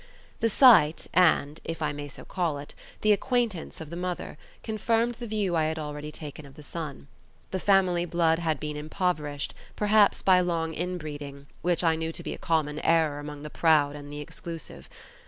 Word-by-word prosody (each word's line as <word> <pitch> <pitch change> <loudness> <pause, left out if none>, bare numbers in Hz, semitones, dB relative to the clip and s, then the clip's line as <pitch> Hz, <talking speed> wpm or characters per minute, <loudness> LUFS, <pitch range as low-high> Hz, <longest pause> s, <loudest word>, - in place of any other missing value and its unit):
The 230 - +2
sight 200 - +6
and 160 -4 +3
(if 165 - -5
I 155 -2 0
may 145 0 -6
so 140 - -11
call 170 -5 -1
it) 145 +1 -9 0.3
the 215 - +4
acquaintance 230 -5 0
of 160 -1 -8
the - - -5
mother 180 0 -4 0.3
confirmed 225 +2 +1
the 240 - -5
view 205 -5 0
I 160 -1 +2
had 160 +1 -1
already 150 0 -5
taken 150 0 -8
of 140 -1 -14
the 150 - -12
son. 150 -2 -6 0.4
The 190 - -1
family 185 -3 +3
blood 165 -1 +2
had 160 -4 -1
been 150 -1 -4
impoverished, 150 -2 -2 0.2
perhaps 210 -1 +4
by 185 -1 +6
long 165 -2 -1
inbreeding, 150 -5 -5 0.2
which 175 0 +1
I 165 -1 +4
knew 160 0 -3
to - - -7
be - - -4
a - - -9
common 155 -2 0
error 160 -3 +2
among 145 0 -7
the 150 - -7
proud 150 -3 +3
and 145 0 -9
the 145 0 -6
exclusive. 165 +2 -8
160 Hz, 190 wpm, -27 LUFS, 150-180 Hz, 0.4 s, sight